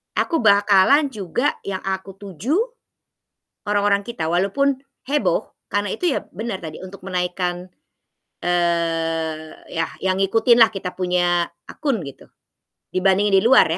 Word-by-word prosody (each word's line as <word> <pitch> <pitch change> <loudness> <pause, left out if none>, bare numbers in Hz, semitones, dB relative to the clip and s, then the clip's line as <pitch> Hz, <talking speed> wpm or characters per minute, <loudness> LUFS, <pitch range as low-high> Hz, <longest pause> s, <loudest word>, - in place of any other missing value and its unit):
aku 330 - +1
bakalan 205 +7 +5
juga 220 - -2
yang 190 -1 -3
aku 190 0 -4
tuju 200 - -3 1.1
orang-orang 205 -1 +1
kita. 165 -9 -3
Walaupun 255 +10 +1 0.3
heboh 295 +1 +1 0.2
karena 205 -1 0
itu 350 -6 0
ya, - - -2
bener 210 -1 -5
tadi 155 -1 -7
untuk 190 0 -10
menaikkan, 180 -1 -2 0.8
eee, 165 -2 0 0.2
yah 165 0 -1
yang 190 0 +1
ngikutin 225 +4 +4
lah 225 - +6
kita 195 -3 -5
punya 175 -1 +1 0.2
akun 275 -7 -2
gitu, 140 - -12 0.7
dibandingin 195 +2 +3
di - - -3
luar 260 +3 +6
195 Hz, 125 wpm, -21 LUFS, 175-220 Hz, 1.1 s, lah